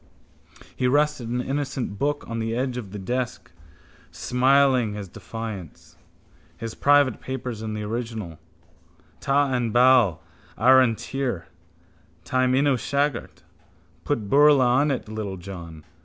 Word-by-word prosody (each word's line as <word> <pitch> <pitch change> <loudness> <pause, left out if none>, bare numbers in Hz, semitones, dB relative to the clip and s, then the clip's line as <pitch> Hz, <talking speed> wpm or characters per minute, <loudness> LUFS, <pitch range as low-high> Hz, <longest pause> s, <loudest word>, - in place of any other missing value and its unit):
He 125 - 0
rested 145 -3 +1
an 125 +1 -1
innocent 135 -5 -3
book 145 +1 -1
on 115 0 -4
the 115 0 -2
edge 130 0 -1
of 120 -6 -6
the 105 - -6
desk, 120 +5 -4 0.6
smiling 130 -3 +2
his 100 -2 -6
defiance. 105 -3 -8 0.6
His 115 -1 -6
private 145 -4 +3
papers 125 -4 -5
in 110 -1 -4
the 105 - -4
original. 110 -6 -5 0.8
Ta 140 0 +1
an 120 -2 0
bad 120 - +5 0.4
ar 130 +5 +6
an 120 -3 +2
tir. 125 -8 -4 0.8
Taim 130 +7 +1
in 140 +2 +3
mo 140 -3 +3
shagart. 130 - -2 0.6
Put 115 -8 -2
beurla 145 +2 +5
on 130 +5 +3
it, 135 -5 -2
littlejohn. 95 -6 -7
125 Hz, 130 wpm, -24 LUFS, 110-135 Hz, 0.8 s, ar